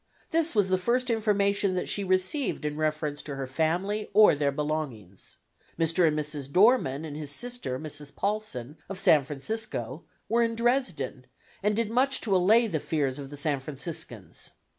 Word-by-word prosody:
This 330 Hz, -4 st, +1 dB
was 205 Hz, -3 st, +3 dB
the 185 Hz, 0 st, +2 dB
first 245 Hz, +5 st, +1 dB
information 200 Hz, -3 st, +1 dB
that 180 Hz, -, -2 dB
she 200 Hz, -, 0 dB
received 185 Hz, -, 0 dB
in 150 Hz, 0 st, -2 dB
reference 155 Hz, -1 st, -1 dB
to 145 Hz, -2 st, -6 dB
her 135 Hz, 0 st, -3 dB
family 175 Hz, +10 st, -1 dB
or 215 Hz, -3 st, +8 dB
their 145 Hz, -1 st, +1 dB
belongings. 140 Hz, -, -4 dB, 0.4 s
Mr. 165 Hz, +1 st, +3 dB
and 155 Hz, -1 st, +1 dB
Mrs. 150 Hz, -2 st, -3 dB
Dohrmann 180 Hz, -, +4 dB
and 150 Hz, -2 st, -7 dB
his 150 Hz, -1 st, -5 dB
sister, 240 Hz, -, -4 dB
Mrs. 150 Hz, 0 st, -7 dB
Paulsen, 200 Hz, -, -3 dB
of 195 Hz, -, -5 dB
San 175 Hz, -7 st, +5 dB
Francisco, 145 Hz, -, -4 dB, 0.2 s
were 235 Hz, +2 st, +2 dB
in 230 Hz, 0 st, +1 dB
Dresden, 200 Hz, -, -1 dB, 0.3 s
and 210 Hz, +1 st, +1 dB
did 225 Hz, -1 st, 0 dB
much 265 Hz, +3 st, +2 dB
to 200 Hz, -4 st, +1 dB
allay 215 Hz, +6 st, +5 dB
the 170 Hz, -8 st, -1 dB
fears 145 Hz, -3 st, -1 dB
of 140 Hz, -1 st, -7 dB
the 145 Hz, -, -8 dB
San 145 Hz, -1 st, 0 dB
Franciscans. 150 Hz, +4 st, -6 dB
165 Hz, 170 wpm, -28 LUFS, 145-215 Hz, 0.4 s, or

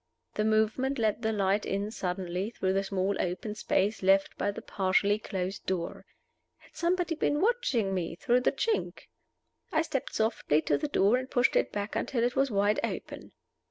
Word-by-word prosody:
The 210 Hz, -, 0 dB
movement 220 Hz, +5 st, +1 dB
let 220 Hz, -1 st, 0 dB
the 220 Hz, -1 st, 0 dB
light 200 Hz, -1 st, +1 dB
in 200 Hz, +2 st, -2 dB
suddenly 180 Hz, 0 st, -3 dB
through 190 Hz, -5 st, -1 dB
the 195 Hz, 0 st, +1 dB
small 195 Hz, 0 st, -1 dB
open 180 Hz, +4 st, -3 dB
space 210 Hz, 0 st, 0 dB
left 195 Hz, +1 st, +3 dB
by -, -, -1 dB
the 200 Hz, -, -5 dB
partially 200 Hz, +2 st, +1 dB
closed 190 Hz, -2 st, -4 dB
door. 175 Hz, -3 st, -3 dB, 0.5 s
Had -, -, -23 dB
somebody 345 Hz, 0 st, 0 dB
been 295 Hz, -2 st, 0 dB
watching 340 Hz, -, +1 dB
me 175 Hz, -3 st, -2 dB
through 240 Hz, +7 st, +2 dB
the -, -, +2 dB
chink? 435 Hz, +10 st, -2 dB, 0.6 s
I 315 Hz, 0 st, +2 dB
stepped 275 Hz, -5 st, -3 dB
softly 220 Hz, -9 st, +1 dB
to -, -, +1 dB
the 300 Hz, -, -1 dB
door, 220 Hz, -4 st, +3 dB
and 260 Hz, +1 st, -5 dB
pushed 245 Hz, -2 st, +2 dB
it -, -, +2 dB
back 205 Hz, +1 st, -4 dB
until 240 Hz, -4 st, 0 dB
it 245 Hz, 0 st, 0 dB
was 270 Hz, +1 st, +2 dB
wide 205 Hz, 0 st, +2 dB
open. -, -, -5 dB
210 Hz, 180 wpm, -29 LUFS, 195-255 Hz, 0.6 s, left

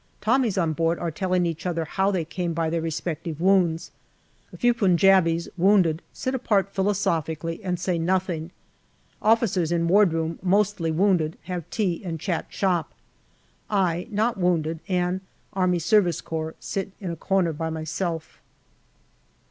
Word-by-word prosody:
Tommies 230 Hz, -2 st, +1 dB
on 165 Hz, -4 st, +1 dB
board 165 Hz, +2 st, +1 dB
are 170 Hz, -1 st, -3 dB
telling 185 Hz, +1 st, 0 dB
each 165 Hz, +1 st, -3 dB
other 165 Hz, -2 st, -1 dB
how 190 Hz, +5 st, 0 dB
they 180 Hz, -5 st, -1 dB
came 175 Hz, +1 st, -3 dB
by 165 Hz, 0 st, -1 dB
their 165 Hz, 0 st, 0 dB
respective 165 Hz, -1 st, -4 dB
wounds. 180 Hz, -3 st, +2 dB, 0.6 s
A -, -, -11 dB
few 245 Hz, -1 st, +3 dB
Punjabis, 185 Hz, -5 st, +3 dB
wounded, 180 Hz, -4 st, +4 dB
sit 260 Hz, -, -3 dB
apart 205 Hz, -6 st, +1 dB
philosophically 165 Hz, -4 st, -1 dB
and 180 Hz, -2 st, -2 dB
say 180 Hz, -2 st, -1 dB
nothing. 175 Hz, -2 st, -1 dB, 0.7 s
Officers 210 Hz, -7 st, +2 dB
in 170 Hz, -1 st, +1 dB
wardroom, 165 Hz, -4 st, +2 dB
mostly 190 Hz, -2 st, +1 dB
wounded, 165 Hz, -2 st, +1 dB
have 175 Hz, -2 st, -5 dB
tea 195 Hz, -6 st, -1 dB
and 165 Hz, -3 st, -4 dB
chat 175 Hz, 0 st, -2 dB
shop. 175 Hz, -5 st, -1 dB, 0.7 s
I, 180 Hz, -4 st, 0 dB
not 220 Hz, 0 st, 0 dB
wounded, 165 Hz, -3 st, +1 dB
and 180 Hz, 0 st, 0 dB, 0.3 s
A.S.C., 185 Hz, +1 st, +3 dB, 0.5 s
sit 195 Hz, 0 st, -4 dB
in 185 Hz, -4 st, -4 dB
a -, -, -4 dB
corner 180 Hz, 0 st, +1 dB
by 160 Hz, +2 st, -3 dB
myself. 160 Hz, +1 st, -4 dB
180 Hz, 140 wpm, -25 LUFS, 165-195 Hz, 0.7 s, wounded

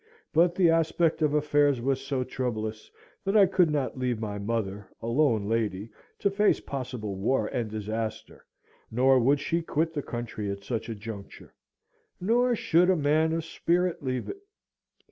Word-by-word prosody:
But 170 Hz, +2 st, +4 dB
the 175 Hz, -3 st, +4 dB
aspect 165 Hz, 0 st, +1 dB
of 150 Hz, -1 st, +2 dB
affairs 145 Hz, -2 st, +3 dB
was 135 Hz, +2 st, 0 dB
so 135 Hz, -1 st, -2 dB
troublous, 110 Hz, -4 st, -4 dB, 0.3 s
that 195 Hz, +2 st, +2 dB
I 200 Hz, -, +8 dB
could 180 Hz, -3 st, +3 dB
not 140 Hz, -3 st, -2 dB
leave 125 Hz, -3 st, -1 dB
my 105 Hz, -2 st, -4 dB
mother, 100 Hz, -2 st, -3 dB
a -, -, -8 dB
lone 115 Hz, -4 st, +2 dB
lady, 110 Hz, -2 st, -1 dB, 0.3 s
to 200 Hz, -, +1 dB
face 205 Hz, +1 st, +3 dB
possible 125 Hz, -7 st, -5 dB
war 110 Hz, +3 st, +1 dB
and 115 Hz, 0 st, -3 dB
disaster, 110 Hz, +1 st, -5 dB, 0.5 s
nor 130 Hz, +3 st, +4 dB
would 140 Hz, +4 st, +3 dB
she 170 Hz, +4 st, -1 dB
quit 160 Hz, 0 st, -1 dB
the 145 Hz, -, -2 dB
country 120 Hz, -5 st, -5 dB
at 100 Hz, 0 st, -5 dB
such 115 Hz, 0 st, -3 dB
a 115 Hz, -, -3 dB
juncture, 105 Hz, -1 st, -9 dB, 0.7 s
nor 240 Hz, +6 st, +2 dB
should 180 Hz, -3 st, +3 dB
a 185 Hz, -, +5 dB
man 155 Hz, +1 st, +2 dB
of 165 Hz, 0 st, -2 dB
spirit 175 Hz, +1 st, 0 dB
leave 130 Hz, -2 st, -3 dB
it. 395 Hz, -, -7 dB
130 Hz, 165 wpm, -27 LUFS, 110-165 Hz, 0.7 s, I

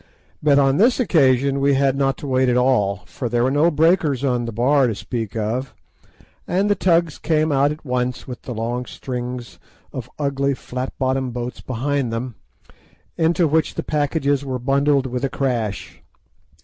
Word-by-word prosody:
But 145 Hz, -2 st, +4 dB
on 135 Hz, 0 st, +3 dB
this 240 Hz, +7 st, +4 dB
occasion 140 Hz, -, +3 dB
we 140 Hz, 0 st, +3 dB
had 135 Hz, 0 st, +2 dB
not 135 Hz, -1 st, +1 dB
to 145 Hz, -, -7 dB
wait 130 Hz, -1 st, +2 dB
at 125 Hz, -, +2 dB
all, 105 Hz, -7 st, +2 dB
for 95 Hz, +7 st, -5 dB
there 120 Hz, 0 st, +1 dB
were 130 Hz, -, +2 dB
no 150 Hz, +4 st, +4 dB
breakers 155 Hz, -4 st, +2 dB
on 125 Hz, -3 st, 0 dB
the 115 Hz, -, -4 dB
Bar 130 Hz, +4 st, +3 dB
to 115 Hz, -, -2 dB
speak 115 Hz, -1 st, -5 dB
of, 115 Hz, +3 st, -2 dB, 0.7 s
and 195 Hz, +3 st, +1 dB
the -, -, +3 dB
tugs 170 Hz, -4 st, +1 dB
came 155 Hz, -1 st, +1 dB
out 140 Hz, +1 st, +3 dB
at 155 Hz, +1 st, -8 dB
once 125 Hz, -1 st, -2 dB
with 125 Hz, -2 st, -7 dB
the 125 Hz, -, -6 dB
long 120 Hz, +3 st, -3 dB
strings 125 Hz, -1 st, -6 dB, 0.3 s
of 125 Hz, -1 st, -6 dB
ugly 140 Hz, -1 st, 0 dB
flat 130 Hz, +1 st, -5 dB
bottomed 130 Hz, -1 st, -1 dB
boats 120 Hz, 0 st, -5 dB
behind 130 Hz, 0 st, -2 dB
them, 120 Hz, +2 st, -4 dB, 0.8 s
into 165 Hz, +1 st, +2 dB
which 160 Hz, +2 st, +1 dB
the -, -, -3 dB
packages 145 Hz, -2 st, 0 dB
were 130 Hz, -2 st, -3 dB
bundled 140 Hz, +2 st, +2 dB
with 125 Hz, 0 st, -3 dB
a 135 Hz, -, +1 dB
crash. 120 Hz, -8 st, -3 dB
135 Hz, 175 wpm, -21 LUFS, 125-145 Hz, 0.8 s, But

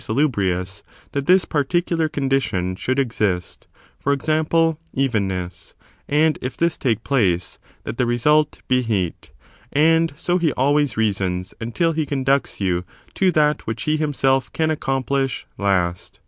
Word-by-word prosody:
salubrious, 95 Hz, -8 st, 0 dB, 0.3 s
that 140 Hz, -1 st, -3 dB
this 185 Hz, 0 st, +5 dB
particular 165 Hz, +2 st, 0 dB
condition 125 Hz, -11 st, 0 dB
should 130 Hz, +7 st, -2 dB
exist; 105 Hz, -9 st, -1 dB, 0.3 s
for 140 Hz, -, 0 dB
example, 155 Hz, +3 st, +1 dB, 0.2 s
evenness, 95 Hz, -9 st, -2 dB, 0.3 s
and, 155 Hz, +1 st, +2 dB
if 130 Hz, -, -5 dB
this 170 Hz, -1 st, +1 dB
take 115 Hz, -4 st, -1 dB
place, 95 Hz, -11 st, 0 dB, 0.2 s
that 110 Hz, +3 st, -6 dB
the 125 Hz, -, +3 dB
result 150 Hz, +6 st, +2 dB
be 130 Hz, 0 st, +3 dB
heat. 100 Hz, -, -2 dB, 0.4 s
And 165 Hz, +2 st, +3 dB
so 175 Hz, +4 st, 0 dB
he 160 Hz, -4 st, +1 dB
always 140 Hz, -1 st, +1 dB
reasons, 95 Hz, -4 st, -1 dB
until 140 Hz, +9 st, 0 dB
he 155 Hz, -2 st, -1 dB
conducts 135 Hz, -1 st, 0 dB
you 90 Hz, -3 st, 0 dB, 0.3 s
to 190 Hz, -1 st, +2 dB
that 150 Hz, -1 st, +2 dB
which 110 Hz, +1 st, -3 dB
he 155 Hz, -, +1 dB
himself 135 Hz, -3 st, +1 dB
can 160 Hz, -1 st, +1 dB
accomplish 135 Hz, -2 st, -1 dB
last. 90 Hz, -3 st, -1 dB
135 Hz, 135 wpm, -21 LUFS, 105-155 Hz, 0.4 s, this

